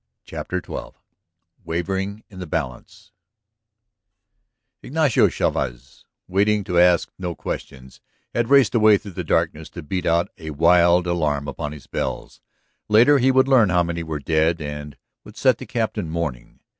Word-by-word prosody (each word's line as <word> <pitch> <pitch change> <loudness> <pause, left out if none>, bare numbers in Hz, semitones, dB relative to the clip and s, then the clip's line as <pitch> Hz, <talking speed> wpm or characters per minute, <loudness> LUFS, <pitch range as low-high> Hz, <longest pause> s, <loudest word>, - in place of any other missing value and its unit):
CHAPTER - - -5
XII - - -7 0.7
WAVERING 95 +5 -3
IN 95 - -13
THE 90 - -6
BALANCE 75 - -6 1.7
Ignacio 150 -3 +2
Chavez, - - -3 0.2
waiting 100 +2 +1
to 90 -3 0
ask 90 -1 +4
no 90 -2 -4
questions, 65 -1 -7 0.3
had 120 0 -1
raced 140 -4 +5
away 110 -3 +5
through 100 - -10
the 90 0 -5
darkness 80 -1 -1
to - - -9
beat 90 +5 -3
out 85 +1 +1
a 80 -1 -7
wild 85 +3 +4
alarm 75 -5 -1
upon 75 +1 -5
his 75 -2 -11
bells. - - -5 0.5
Later 120 +7 +5
he 130 +1 +3
would 130 0 +3
learn 125 -7 +5
how 90 -1 +3
many 85 0 -3
were 80 -2 -4
dead 80 +3 +1
and 75 -1 -7 0.3
would 105 - -14
set 130 -3 +3
the - - -9
Captain 110 -7 -2
mourning. 80 -8 -5
85 Hz, 150 wpm, -22 LUFS, 80-105 Hz, 1.7 s, raced